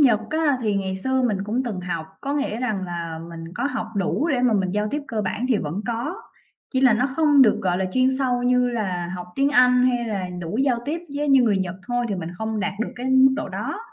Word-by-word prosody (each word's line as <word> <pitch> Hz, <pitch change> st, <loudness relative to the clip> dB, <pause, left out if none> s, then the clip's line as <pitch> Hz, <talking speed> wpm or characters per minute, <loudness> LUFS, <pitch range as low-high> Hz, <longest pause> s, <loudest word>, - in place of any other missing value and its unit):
Nhật 240 Hz, -7 st, +5 dB
á, 310 Hz, -3 st, +2 dB
thì 215 Hz, -4 st, 0 dB
ngày 190 Hz, -1 st, -2 dB
xưa 260 Hz, +6 st, 0 dB
mình 220 Hz, -6 st, +1 dB
cũng 230 Hz, +5 st, -1 dB
từng 210 Hz, -7 st, -4 dB
học, 175 Hz, -3 st, -4 dB
có 280 Hz, -, -3 dB
nghĩa 285 Hz, -6 st, -1 dB
rằng 215 Hz, -7 st, -1 dB
là 170 Hz, -2 st, -5 dB
mình 165 Hz, -1 st, -8 dB
có 240 Hz, -, -2 dB
học 280 Hz, -5 st, -2 dB
đủ 200 Hz, -, 0 dB
để 265 Hz, -6 st, +1 dB
mà 250 Hz, -2 st, +3 dB
mình 190 Hz, -3 st, +1 dB
giao 210 Hz, +2 st, -1 dB
tiếp 295 Hz, 0 st, -2 dB
cơ 225 Hz, -2 st, -2 dB
bản 210 Hz, +5 st, -2 dB
thì 245 Hz, -, +3 dB
vẫn 165 Hz, +6 st, -3 dB
có, 240 Hz, +10 st, -2 dB, 0.6 s
chỉ 260 Hz, -, +1 dB
là 260 Hz, -3 st, +6 dB
nó 245 Hz, +4 st, +2 dB
không 290 Hz, 0 st, +4 dB
được, 220 Hz, -, +4 dB
gọi 180 Hz, -1 st, +1 dB
là, 190 Hz, -, 0 dB
chuyên 255 Hz, 0 st, +3 dB
sâu 250 Hz, -2 st, 0 dB
như 250 Hz, 0 st, +3 dB
là 185 Hz, -7 st, -2 dB
học 180 Hz, 0 st, -7 dB
tiếng 275 Hz, +1 st, +2 dB
Anh 250 Hz, -2 st, +5 dB
hay 245 Hz, -2 st, +1 dB
là 200 Hz, -5 st, -3 dB
đủ 170 Hz, +6 st, -4 dB
giao 265 Hz, -3 st, +2 dB
tiếp 305 Hz, +4 st, -2 dB, 0.2 s
với 295 Hz, +1 st, -1 dB
như 270 Hz, -2 st, +6 dB
người 210 Hz, -4 st, +3 dB
Nhật 185 Hz, -1 st, -2 dB
thôi 245 Hz, 0 st, 0 dB
thì 205 Hz, -, -1 dB
mình 175 Hz, -2 st, -5 dB
không 220 Hz, +2 st, -3 dB
đạt 205 Hz, -1 st, -1 dB
được -, -, -1 dB
cái 250 Hz, +1 st, -4 dB
mức 260 Hz, 0 st, +6 dB
độ -, -, -3 dB
đó. -, -, -4 dB
235 Hz, 260 wpm, -23 LUFS, 190-260 Hz, 0.6 s, là